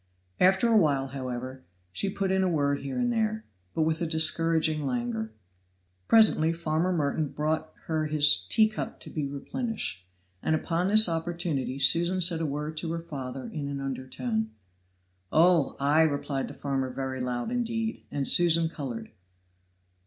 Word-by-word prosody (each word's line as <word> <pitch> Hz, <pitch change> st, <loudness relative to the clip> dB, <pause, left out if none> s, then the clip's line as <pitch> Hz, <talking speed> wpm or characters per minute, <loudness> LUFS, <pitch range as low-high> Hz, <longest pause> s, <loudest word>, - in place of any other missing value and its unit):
After 190 Hz, +5 st, +4 dB
a 230 Hz, -1 st, +4 dB
while, 140 Hz, -7 st, +2 dB
however, 130 Hz, 0 st, -6 dB, 0.3 s
she 200 Hz, -, -1 dB
put 195 Hz, 0 st, -2 dB
in 190 Hz, 0 st, +2 dB
a 185 Hz, -, +1 dB
word 140 Hz, -4 st, 0 dB
here 135 Hz, -1 st, -5 dB
and 245 Hz, -1 st, 0 dB
there, 220 Hz, -1 st, -1 dB, 0.3 s
but 160 Hz, -, +2 dB
with 160 Hz, +1 st, 0 dB
a 170 Hz, -, 0 dB
discouraging 160 Hz, -1 st, +2 dB
languor. 120 Hz, -3 st, -3 dB, 0.8 s
Presently 210 Hz, -8 st, +5 dB
Farmer 165 Hz, +2 st, -1 dB
Merton 155 Hz, -2 st, 0 dB
brought 155 Hz, +2 st, -2 dB
her 155 Hz, -1 st, -1 dB
his 145 Hz, -11 st, +4 dB
tea 215 Hz, -, +4 dB
cup 215 Hz, -, -6 dB
to -, -, -10 dB
be 150 Hz, -3 st, -3 dB
replenished, 140 Hz, -, -5 dB, 0.3 s
and 160 Hz, -, +1 dB
upon 170 Hz, +3 st, -1 dB
this 215 Hz, +1 st, +6 dB
opportunity 165 Hz, -5 st, -2 dB
Susan 170 Hz, +7 st, +3 dB
said 170 Hz, -2 st, +3 dB
a 160 Hz, -, -1 dB
word 150 Hz, +2 st, -4 dB
to 165 Hz, +1 st, -3 dB
her 165 Hz, -, -3 dB
father 135 Hz, -6 st, -7 dB
in 145 Hz, -3 st, -4 dB
an 140 Hz, 0 st, -4 dB
undertone. 130 Hz, -4 st, -3 dB, 0.8 s
"Oh, 165 Hz, -2 st, +3 dB
ay!" 145 Hz, +3 st, +3 dB
replied 145 Hz, -3 st, -1 dB
the -, -, -10 dB
farmer 135 Hz, -2 st, -2 dB
very 130 Hz, 0 st, -4 dB
loud 125 Hz, -, -3 dB
indeed; 230 Hz, -2 st, -2 dB
and 140 Hz, -2 st, -2 dB
Susan 165 Hz, -1 st, +6 dB
colored. 135 Hz, -8 st, -7 dB
155 Hz, 160 wpm, -27 LUFS, 135-175 Hz, 0.8 s, this